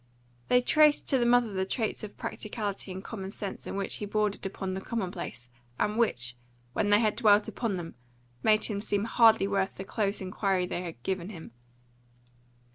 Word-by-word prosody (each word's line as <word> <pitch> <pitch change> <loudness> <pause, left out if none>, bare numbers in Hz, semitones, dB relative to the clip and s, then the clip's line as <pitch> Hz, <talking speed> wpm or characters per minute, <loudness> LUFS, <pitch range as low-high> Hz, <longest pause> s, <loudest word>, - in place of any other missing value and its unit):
They 250 - +5
traced 300 +3 +4
to 265 - +4
the 240 - +2
mother 240 -3 +4
the 190 0 0
traits 220 +3 -2
of 210 - -8
practicality 205 -3 -4
and 190 +1 -6
common 195 -4 -6
sense 200 0 -6
in - - -4
which 195 -1 -2
he 205 - -5
bordered 210 0 0
upon 190 -1 -4
the 190 - -4
commonplace, 185 - -4 0.3
and 210 0 0
which, 125 - 0 0.4
when 205 - +1
they 205 0 +6
had 215 -2 +2
dwelt 210 -2 +5
upon 225 -6 -2
them, 165 -2 -6 0.5
made 215 -1 +4
him 205 -2 -3
seem 205 -1 0
hardly 225 -3 +5
worth 195 -1 0
the 190 - -6
close 200 0 -1
inquiry 190 -1 0
they 180 - -3
had 165 -9 -8
given 190 -1 -2
him. 170 -6 -9
205 Hz, 185 wpm, -29 LUFS, 190-220 Hz, 0.5 s, they